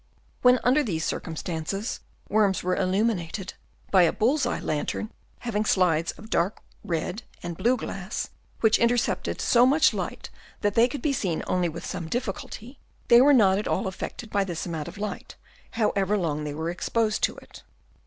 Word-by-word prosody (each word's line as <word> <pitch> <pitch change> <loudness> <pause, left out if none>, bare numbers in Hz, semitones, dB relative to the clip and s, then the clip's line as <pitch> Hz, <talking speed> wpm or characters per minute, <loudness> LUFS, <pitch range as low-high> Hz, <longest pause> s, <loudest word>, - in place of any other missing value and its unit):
When 250 0 +6
under 255 +5 +4
these 165 - -2
circumstances 165 +5 -3 0.3
worms 205 -2 +2
were 180 0 +1
illuminated 190 -1 -1 0.4
by 190 - +6
a 170 - +5
bull's 255 +4 +1
eye - - -1
lantern 155 +8 -2 0.3
having 220 -3 -1
slides 175 -5 +2
of 215 +2 -14
dark 180 +5 +1 0.2
red 175 +5 -2 0.2
and 175 -1 -4
blue 245 +8 +2
glass, 195 -2 -5 0.3
which 220 -1 +4
in 235 - +4
tercepted 240 -1 -1
so 240 0 +4
much 295 +4 +4
light - - -5 0.3
that 205 -1 +1
they 230 +3 +5
could 255 0 -6
be 295 - +2
seen 185 -10 -1
only 180 -1 +1
with 165 +2 -7
some 175 -4 -5
difficulty, 245 - -5 0.3
they 240 0 +8
were 285 +3 +6
not 200 -7 +5
at 210 - -3
all - - 0
affected 190 +4 -6
by 200 -1 +2
this 175 -4 -4
amount 160 -4 -4
of - - -9
light, 210 0 -5 0.3
however 210 -3 +1
long 155 -5 -1
they 145 -1 -4
were 160 +2 -2
exposed 215 +4 0
to - - -5
it. - - -14
200 Hz, 175 wpm, -26 LUFS, 175-235 Hz, 0.4 s, they